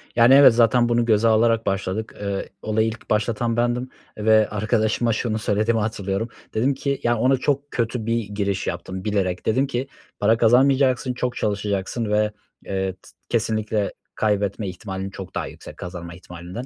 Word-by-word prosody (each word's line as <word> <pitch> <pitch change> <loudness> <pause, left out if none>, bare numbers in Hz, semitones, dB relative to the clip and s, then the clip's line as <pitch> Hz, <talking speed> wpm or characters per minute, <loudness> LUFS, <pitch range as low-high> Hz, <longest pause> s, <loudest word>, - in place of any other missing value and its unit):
Yani, 120 +2 +6
evet, 140 -3 +8
zaten 120 +1 +4
bunu 120 0 +2
göze 110 0 +3
alarak 115 0 +3
başladık. 100 +2 -2
Eee, 100 -1 -3
olayı 110 +1 +1
ilk 110 0 -7
başlatan 115 +2 0
bendim 120 +1 0 0.3
ve 110 0 +4
arkadaşıma 110 +2 +1
şunu 110 0 -1
söylediğimi 110 +2 +1
hatırlıyorum. 105 0 -2 0.2
Dedim 125 +6 +2
ki, 140 0 -2
ya, 120 0 +2
ona 130 +4 +3
çok 140 +2 -1
kötü 115 -1 -2
bir 115 0 0
giriş 100 -1 -2
yaptım 95 +2 -5
bilerek, 95 -4 -1
dedim 130 +5 +2
ki, 135 0 -3 0.3
"Para 110 +2 +3
kazanmayacaksın, 130 +2 +3
çok 125 0 -2
çalışacaksın 105 +1 -2
ve, 105 0 +2 0.3
eee, 95 -1 -1
t 90 - -26 0.3
kesinlikle 110 -2 0 0.2
kaybetme 105 -1 0
ihtimalin 95 +1 -6
çok 95 -2 -9
daha - - -2
yüksek - - -11
kazanma 90 -1 -7
ihtimalinden." 90 +6 -8
110 Hz, 160 wpm, -23 LUFS, 100-120 Hz, 0.3 s, evet